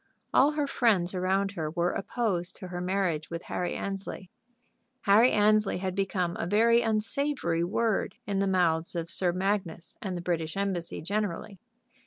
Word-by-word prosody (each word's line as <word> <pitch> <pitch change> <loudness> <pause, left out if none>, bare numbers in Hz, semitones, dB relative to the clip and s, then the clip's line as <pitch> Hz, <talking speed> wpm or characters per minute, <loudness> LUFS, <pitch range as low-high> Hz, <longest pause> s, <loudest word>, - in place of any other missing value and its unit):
All 285 +3 +5
her 300 -1 0
friends 210 -10 +2
around 190 +2 0
her 160 -6 -3
were 170 +2 0
opposed 195 -5 -1
to 185 -4 -8
her 175 0 -4
marriage 180 -4 -1
with 170 0 -5
Harry 180 - -3
Annesley. 195 -2 -5 0.7
Harry 220 +4 +5
Annesley 210 0 +3
had 185 0 -3
become 185 -2 -1
a - - -2
very 230 +4 +4
unsavory 220 - 0
word 215 +4 0
in 200 -2 -1
the 195 - +1
mouths 175 -3 +1
of 170 0 -3
Sir 180 -2 +1
Magnus 185 -3 -2
and 185 -3 -3
the - - -5
British 165 -1 -2
Embassy 190 -6 -2
generally. 200 +1 -3
190 Hz, 160 wpm, -28 LUFS, 175-210 Hz, 0.7 s, All